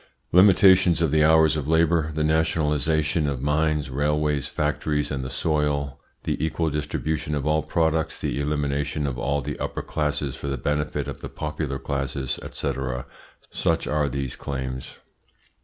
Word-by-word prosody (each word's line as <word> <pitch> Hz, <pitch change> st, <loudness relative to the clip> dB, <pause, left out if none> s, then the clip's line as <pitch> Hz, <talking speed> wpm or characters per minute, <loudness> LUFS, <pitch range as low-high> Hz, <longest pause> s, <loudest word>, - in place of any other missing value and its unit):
Limitations 95 Hz, -2 st, +6 dB
of 80 Hz, -4 st, +1 dB
the 75 Hz, 0 st, +4 dB
hours 80 Hz, 0 st, +5 dB
of 75 Hz, -2 st, -3 dB
labour, 80 Hz, 0 st, +2 dB
the 80 Hz, -, 0 dB
nationalisation 80 Hz, 0 st, +1 dB
of 70 Hz, -3 st, -2 dB
mines, 75 Hz, 0 st, 0 dB
railways, 75 Hz, +1 st, 0 dB
factories, 75 Hz, 0 st, -1 dB
and 65 Hz, -2 st, -2 dB
the 65 Hz, -, -4 dB
soil, 70 Hz, -1 st, -1 dB, 0.2 s
the -, -, -2 dB
equal 80 Hz, 0 st, 0 dB
distribution 75 Hz, 0 st, -2 dB
of 70 Hz, -1 st, -3 dB
all 75 Hz, 0 st, +2 dB
products, 80 Hz, 0 st, 0 dB
the 70 Hz, -, -2 dB
elimination 75 Hz, 0 st, -1 dB
of 65 Hz, -3 st, -3 dB
all 70 Hz, +3 st, 0 dB
the -, -, -5 dB
upper -, -, -3 dB
classes 75 Hz, -3 st, -2 dB
for 70 Hz, -, -6 dB
the 70 Hz, -1 st, -2 dB
benefit 75 Hz, +1 st, -1 dB
of 70 Hz, -, -7 dB
the -, -, -6 dB
popular 75 Hz, -2 st, -4 dB
classes, 70 Hz, -1 st, -3 dB
&c., -, -, -2 dB, 0.8 s
such 80 Hz, 0 st, 0 dB
are 75 Hz, -1 st, 0 dB
these 70 Hz, -1 st, -3 dB
claims. 65 Hz, -2 st, -5 dB
75 Hz, 155 wpm, -24 LUFS, 70-80 Hz, 0.8 s, Limitations